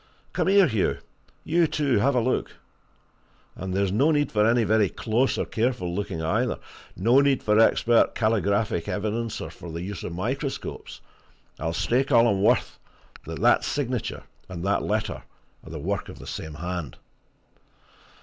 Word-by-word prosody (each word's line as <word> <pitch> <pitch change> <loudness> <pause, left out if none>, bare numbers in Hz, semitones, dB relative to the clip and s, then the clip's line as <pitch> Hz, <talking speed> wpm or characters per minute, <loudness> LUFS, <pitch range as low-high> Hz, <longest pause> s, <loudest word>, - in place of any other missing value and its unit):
Come - - 0
here, 195 0 +6
Hugh! 110 - 0 0.5
you, 165 +1 +2
too, 140 -7 +1
have 135 +5 +2
a - - +4
look. 125 +2 -1 1.0
And 95 0 -5
there's 100 0 0
no 135 +10 +3
need 145 -2 +1
for 105 -1 +2
any 120 0 +3
very 105 -2 +3
close 115 +9 0
or - - -1
careful 115 -6 -1
looking, 95 -4 -3
either! 80 - 0 0.4
no 115 +9 +4
need 140 -2 +2
for 105 0 +3
expert 115 +1 +4
calligraphic 105 -5 0
evidence, 110 +2 -2
or - - -6
for 85 - -10
the 85 +2 -5
use 100 +1 -6
of 85 - -5
microscopes. 135 +9 -4 0.6
I'll 80 +2 -2
stake 130 - 0
all 120 -2 +6
I'm 100 -4 +1
worth - - +2 0.5
that - - -6
that - - +4
signature 130 -5 -3 0.3
and 90 -2 -6
that 100 +1 +1
letter 110 0 -2 0.4
are - - -12
the 80 - -6
work 95 +6 -3
of - - -10
the - - -11
same 80 -1 -6
hand!" 85 -4 -5
110 Hz, 165 wpm, -25 LUFS, 95-125 Hz, 1.0 s, here